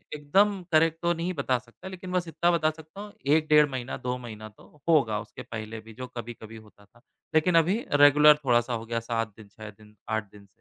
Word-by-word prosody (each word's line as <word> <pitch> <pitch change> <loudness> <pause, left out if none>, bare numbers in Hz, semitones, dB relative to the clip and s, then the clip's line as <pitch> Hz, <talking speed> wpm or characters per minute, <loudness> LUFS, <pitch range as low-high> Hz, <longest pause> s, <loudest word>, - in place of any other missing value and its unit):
एकदम 195 +7 +2
करेक्ट 165 0 +3
तो 170 0 +1
नहीं 170 +2 -3
बता 135 -5 0
सकता 120 +8 -14
लेकिन 185 -1 -8
बस 180 -1 -1
इतना 170 +1 +1
बता 165 -2 +2
सकता 160 +5 -12
हूँ 210 0 -10 0.2
1 155 -1 +1
डेढ़ 150 -1 +6
महीना, 130 -1 -5
2 125 0 -3
महीना 110 -3 -9
तो 135 +7 -21
होगा 115 -10 +3
उसके 105 - -10
पहले 110 0 -7
भी 115 0 -14
जो 125 +3 -8
कभी-कभी 120 -2 -9
होता 105 -2 -18
था। 115 +4 -26 0.3
लेकिन 165 +3 +3
अभी 185 +9 +2
रेगुलर 145 +1 +7
थोड़ा-सा 120 -1 +2
हो 115 -1 -4
गया 115 0 -2
7 115 -2 -3
दिन, 110 -2 -13
छह 110 +1 -11
दिन, 105 +1 -18
8 110 0 -1
दिन 100 -1 -16
130 Hz, 215 wpm, -27 LUFS, 110-165 Hz, 0.3 s, रेगुलर